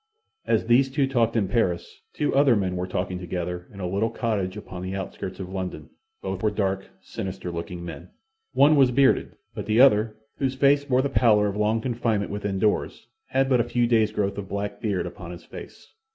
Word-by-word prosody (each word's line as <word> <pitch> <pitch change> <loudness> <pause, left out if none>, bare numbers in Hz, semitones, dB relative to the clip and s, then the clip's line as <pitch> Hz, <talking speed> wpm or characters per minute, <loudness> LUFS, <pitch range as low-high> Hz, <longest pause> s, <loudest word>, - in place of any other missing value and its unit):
As - - +2
these 125 +3 +4
two 140 +1 +1
talked 120 -4 +1
in 105 -4 +2
Paris, 90 -7 -1
two 150 - -1
other 135 -3 +5
men 95 -3 -1
were 90 0 -2
talking 90 0 -3
together 90 0 -4
in 100 - -12
a 90 - -2
little 100 +5 0
cottage 105 -5 -2
upon 90 -1 -8
the 95 +1 -4
outskirts 95 -1 -6
of 95 -1 -6
London. 95 -1 -5 0.3
Both - - -3
were 110 - +2
dark, 95 -2 -2
sinister 95 -1 -5
looking 85 +1 -6
men. 85 - -8 0.4
One 150 +2 +6
was 135 -3 +5
bearded, 130 +2 +2 0.2
but - - -6
the 110 +2 +2
other, 110 -4 +5 0.2
whose 135 -1 -1
face 140 +1 +3
wore 130 0 +3
the 140 - 0
pallor 110 -6 +4
of 100 -1 -1
long 105 +2 +1
confinement 115 -4 -1
within 100 -1 -2
doors, 105 +1 0 0.2
had 135 0 +1
but 130 -2 +3
a - - +2
few 120 0 +1
days' 110 -2 +3
growth 100 -1 -1
of 100 -1 -7
black 100 0 -4
beard 100 -4 -1
upon 85 -2 -8
his 85 0 -9
face. - - -12
105 Hz, 205 wpm, -25 LUFS, 95-120 Hz, 0.4 s, One